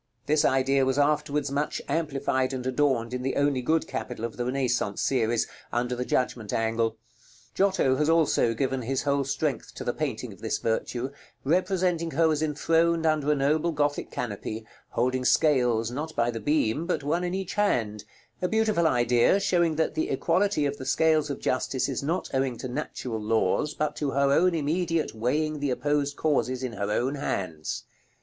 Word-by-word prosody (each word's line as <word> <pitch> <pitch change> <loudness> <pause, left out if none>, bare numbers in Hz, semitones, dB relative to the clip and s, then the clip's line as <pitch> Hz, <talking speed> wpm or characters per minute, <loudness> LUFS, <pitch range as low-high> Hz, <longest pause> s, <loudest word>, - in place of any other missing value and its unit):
This 150 +1 +3
idea 135 0 +3
was 130 +1 +1
afterwards 145 0 +1
much 145 +2 -1
amplified 135 -4 0
and 130 -1 -4
adorned 130 -3 +1
in 125 - -2
the 135 +1 -2
only 140 -2 +2
good 160 +5 +1
capital 120 -2 -4
of 115 - -6
the 120 - -3
Renaissance 125 -5 0
series, 120 -3 +1 0.3
under 120 +1 -1
the 125 +1 -3
Judgment 120 -5 -1
angle. 115 0 0 0.6
Giotto 190 -9 +2
has 150 +1 +1
also 155 -8 +3
given 130 +2 -1
his 130 +3 -2
whole 140 -1 +1
strength 135 - -2
to - - -6
the - - -1
painting - - -3
of - - -18
this - - -1
virtue, 120 +3 -2 0.3
representing 180 +1 +1
her 160 +1 +2
as 150 -1 0
enthroned 165 +2 +1
under 155 -2 +2
a - - +3
noble 150 +4 +1
Gothic 145 -1 -1
canopy, 110 -1 -5 0.2
holding 130 +2 0
scales, 125 -6 +3
not 155 +5 -5
by 120 0 +1
the 115 - -5
beam, 145 +3 0
but 180 - -1
one 165 +5 0
in 180 +1 -2
each 190 -1 -4
hand; 115 - 0 0.4
a 180 - +1
beautiful 215 -5 +2
idea, 120 +6 +3
showing 170 -5 +2
that 160 0 0
the 155 0 -1
equality 170 +3 +1
of 140 0 -2
the 130 - -7
scales 155 +1 +3
of 140 - -4
Justice 130 0 0
is 135 - -2
not 160 +6 -1
owing 130 -2 0
to 130 - -5
natural 125 -4 -4
laws, 110 +6 +1
but 150 -1 -1
to 145 - -1
her 140 0 +2
own 175 +4 +4
immediate 165 +2 0
weighing 150 +7 -1
the 145 -1 -1
opposed 145 +3 0
causes 130 -4 0
in 125 -2 -3
her 100 -2 -3
own 125 +6 0
hands. 90 - -3
140 Hz, 180 wpm, -27 LUFS, 125-155 Hz, 0.6 s, own